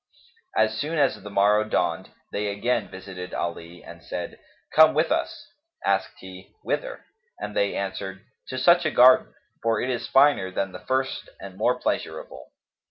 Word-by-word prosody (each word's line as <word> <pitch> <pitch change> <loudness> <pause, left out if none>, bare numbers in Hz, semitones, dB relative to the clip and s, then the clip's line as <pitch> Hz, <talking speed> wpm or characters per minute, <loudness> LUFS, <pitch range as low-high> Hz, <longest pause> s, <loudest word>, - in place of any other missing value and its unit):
As 110 0 +2
soon 155 +3 -2
as 135 -7 +2
the 105 - -9
morrow 105 +2 +3
dawned, 110 - -1 0.2
they 105 0 -2
again 105 +2 -1
visited 95 -1 -8
Ali 85 0 -5
and - - -12
said, - - -6 0.3
"Come 155 -1 +7
with 155 +2 +2
us." 330 +1 -2 0.4
Asked - - 0
he, - - -12
"Whither?"; - - -3 0.3
and 105 - -6
they 100 0 +1
answered, 95 +1 -5 0.2
"To 130 - -5
such 175 +7 +5
a 155 - +1
garden; 130 -2 +5 0.3
for 115 -1 +1
it 130 - -1
is 120 - -3
finer 135 -8 +4
than 95 +1 -2
the - - -9
first 130 0 -2
and 95 -1 -9
more 125 +5 +1
pleasurable." 65 - -4
110 Hz, 165 wpm, -25 LUFS, 95-130 Hz, 0.4 s, Come